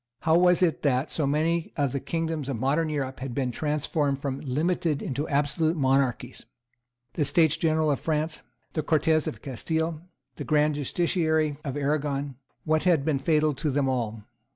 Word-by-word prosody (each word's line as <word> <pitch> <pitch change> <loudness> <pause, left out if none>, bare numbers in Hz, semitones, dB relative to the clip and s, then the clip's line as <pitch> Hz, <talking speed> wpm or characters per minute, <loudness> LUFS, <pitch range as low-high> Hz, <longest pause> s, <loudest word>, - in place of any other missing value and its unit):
How 160 -1 +3
was 180 0 +4
it 165 -3 +1
that 135 0 +1
so 150 -4 -1
many 160 +3 0
of 140 -3 +1
the 140 - -2
kingdoms 160 -2 -3
of 135 - -2
modern 145 +7 +1
Europe 135 -3 -3
had 130 -2 -5
been 130 -3 0
transformed 150 0 -1
from 140 -1 -3
limited 155 +2 0
into 145 +3 -3
absolute 150 +3 +1
monarchies? 130 -2 0 0.7
The 155 - 0
States 160 +1 +3
General 160 -2 +1
of 140 - 0
France, 160 0 -1 0.3
the 155 - 0
Cortes 155 0 +2
of 110 - -6
Castile, 160 +5 -2 0.4
the - - -4
Grand 150 -1 +2
Justiciary 155 0 0
of 140 -1 -4
Arragon, 140 -1 -1 0.3
what 155 +1 +1
had 165 -6 +3
been 150 -4 +1
fatal 155 +1 +2
to 150 +3 -2
them 140 0 +1
all? 115 -4 -2
150 Hz, 170 wpm, -26 LUFS, 135-160 Hz, 0.7 s, was